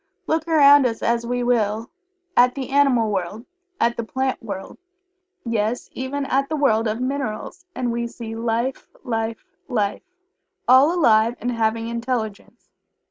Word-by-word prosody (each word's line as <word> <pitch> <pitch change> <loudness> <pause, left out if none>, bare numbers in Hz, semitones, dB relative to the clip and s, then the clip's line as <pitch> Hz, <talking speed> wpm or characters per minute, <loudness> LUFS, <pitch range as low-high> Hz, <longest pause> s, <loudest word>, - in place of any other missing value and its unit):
Look 320 -1 -1
around 285 -4 +6
us 225 -2 -5
as 235 0 0
we 245 0 -1
will 225 -2 0 0.4
at 245 +1 +5
the 270 -1 -5
animal 265 -6 +3
world 200 +4 -3 0.3
at 235 0 +1
the 235 - -2
plant 260 +3 -2
world 195 +1 -7 0.7
yes, 230 0 -2
even 275 +2 -3
at 275 +1 0
the 315 - -1
world 230 -6 +2
of 215 +2 -2
minerals 260 +4 -4
and 245 -2 -1
we 235 0 -2
see 230 -1 -8
life, 235 +3 -2 0.2
life, 225 +3 -3 0.2
life 210 -6 -1 0.7
all 260 +5 +6
alive 230 -9 +3
and 245 - -2
having 225 -1 0
intelligence. 235 -3 -4
235 Hz, 145 wpm, -22 LUFS, 225-265 Hz, 0.7 s, around